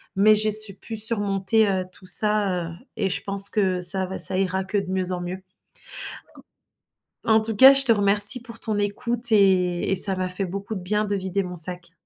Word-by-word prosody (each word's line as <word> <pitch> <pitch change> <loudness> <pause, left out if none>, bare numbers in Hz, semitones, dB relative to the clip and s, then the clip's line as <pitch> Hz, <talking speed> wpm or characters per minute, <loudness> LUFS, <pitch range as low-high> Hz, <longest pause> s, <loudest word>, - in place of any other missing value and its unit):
Mais 215 +2 +2
j'ai 215 +1 -1
su 215 -2 +3
pu 225 +3 -11
surmonter, 210 -1 0
heu, 190 -2 -4
tout 185 - -13
ça, 200 -3 +4
heu 170 - -12 0.2
et 195 -3 -3
je 185 - -2
pense 195 0 +2
que 190 -4 -3
ça 185 +2 0
va, 190 +1 -9
ça 185 - -2
ira 190 0 -4
que 190 +2 -6
de 195 -2 -6
mieux 185 -1 -4
en 180 - -6
mieux 180 +2 -9 1.8
en 220 0 +1
tout 220 +1 -3
cas, 265 +6 +6
je 275 0 +2
te 240 - +2
remercie 205 +2 +5
pour 230 -2 -6
ton 215 -2 -4
écoute 235 +4 -3
et 185 -5 -1
et - - -2
ça 190 +1 +5
m'a 185 0 -5
fait 185 +2 -2
beaucoup 200 +4 -8
de 190 - -8
bien 210 +4 -4
de 205 -1 -5
vider 190 0 -5
mon 180 0 -10
sac. 175 0 -1
195 Hz, 215 wpm, -20 LUFS, 185-215 Hz, 1.8 s, cas